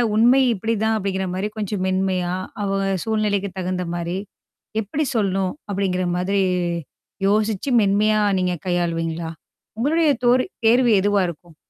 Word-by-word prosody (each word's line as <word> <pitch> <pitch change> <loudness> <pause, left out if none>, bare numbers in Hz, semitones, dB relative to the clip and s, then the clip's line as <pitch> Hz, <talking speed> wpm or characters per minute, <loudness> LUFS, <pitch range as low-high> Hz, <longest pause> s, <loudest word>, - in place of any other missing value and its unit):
"உண்மை 245 +5 +5
இப்படிதான்." 220 +1 0
அப்படிங்கிற 190 -2 -2
மாரி, 200 +3 -2
கொஞ்சம் 205 -2 -2
மென்மையா, 185 -1 0 0.3
அவ 195 - -1 0.3
சூழ்நிலைக்கு 205 -3 0
தகுந்த 180 0 -2
மாரி. 175 +1 -3 0.7
எப்படி 280 +10 -2
சொல்லணும் 195 -3 0 0.2
அப்படிங்கிற 185 -2 0
மாதிரி, 195 +2 +1 0.8
யோசிச்சு, 215 +4 +1
மென்மையா 210 +2 +3 0.2
நீங்க 180 -1 0
கையாளுவீங்களா? 165 -2 -1 0.5
உங்களுடைய 310 +5 +3
தோர் 245 +1 +5 0.2
தேர்வு 240 +1 +5
எதுவா 205 +1 +2
இருக்கும்? 170 -1 -10
195 Hz, 120 wpm, -22 LUFS, 185-215 Hz, 0.8 s, உண்மை